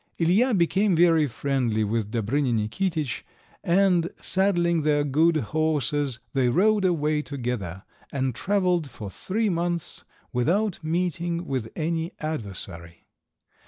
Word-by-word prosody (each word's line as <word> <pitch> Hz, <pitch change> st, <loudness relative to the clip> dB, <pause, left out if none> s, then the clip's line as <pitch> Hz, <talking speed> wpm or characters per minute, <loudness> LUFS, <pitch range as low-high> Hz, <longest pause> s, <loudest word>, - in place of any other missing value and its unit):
Ilija 200 Hz, +8 st, +3 dB
became 190 Hz, +3 st, +2 dB
very 165 Hz, -2 st, +4 dB
friendly 125 Hz, -4 st, 0 dB
with 105 Hz, 0 st, -1 dB
Dobrinja 120 Hz, +4 st, 0 dB
Nikititsch, 145 Hz, -, -1 dB, 0.4 s
and, 175 Hz, -1 st, +3 dB
saddling 175 Hz, -4 st, +2 dB
their 145 Hz, -1 st, +2 dB
good 155 Hz, +4 st, +3 dB, 0.2 s
horses, 145 Hz, -4 st, 0 dB, 0.2 s
they 130 Hz, -3 st, +2 dB
rode 205 Hz, -, +3 dB
away 155 Hz, -4 st, +1 dB
together, 120 Hz, -, -4 dB, 0.3 s
and 130 Hz, -2 st, -1 dB
travelled 180 Hz, -, 0 dB
for 105 Hz, -5 st, -8 dB
three 215 Hz, -, -1 dB
months 170 Hz, -1 st, -2 dB, 0.3 s
without 175 Hz, -, +1 dB
meeting 170 Hz, +1 st, -1 dB
with 130 Hz, -6 st, -3 dB
any 165 Hz, +1 st, -2 dB
adversary. 95 Hz, -, -6 dB
155 Hz, 115 wpm, -25 LUFS, 125-175 Hz, 0.4 s, very